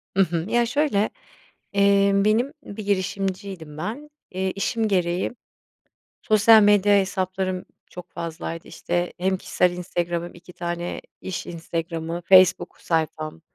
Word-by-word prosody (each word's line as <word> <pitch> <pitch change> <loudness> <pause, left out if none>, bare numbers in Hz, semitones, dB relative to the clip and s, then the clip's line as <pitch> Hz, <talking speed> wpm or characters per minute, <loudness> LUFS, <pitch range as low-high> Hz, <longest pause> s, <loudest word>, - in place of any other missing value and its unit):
Hı 195 - +4
hı. 170 -2 -2
Ya 240 +1 +3
şöyle, 245 -5 +1 0.6
emm, 200 0 +4
benim 230 +6 +2
bir 210 +1 -7
girişimciydim 190 -4 -3
ben, 260 - -5 0.2
eee, 190 +1 -2
işim 220 +3 -1
gereği 180 -1 0 0.9
sosyal 215 +1 +6
medya 205 0 +5
hesaplarım 185 -1 -2 0.3
çok 180 -1 -10
fazlaydı 165 0 -6
işte 175 0 -2
hem 190 +1 +1
kişisel 180 -1 +1
Instagram 175 -1 -2
hem 175 - -10
2 175 +1 -14
tane 175 0 -4 0.2
iş 190 - -5
Instagram'ı, 165 0 -4
Facebook 185 -1 +5
sayfam. 160 -1 -2
185 Hz, 125 wpm, -24 LUFS, 175-200 Hz, 0.9 s, sosyal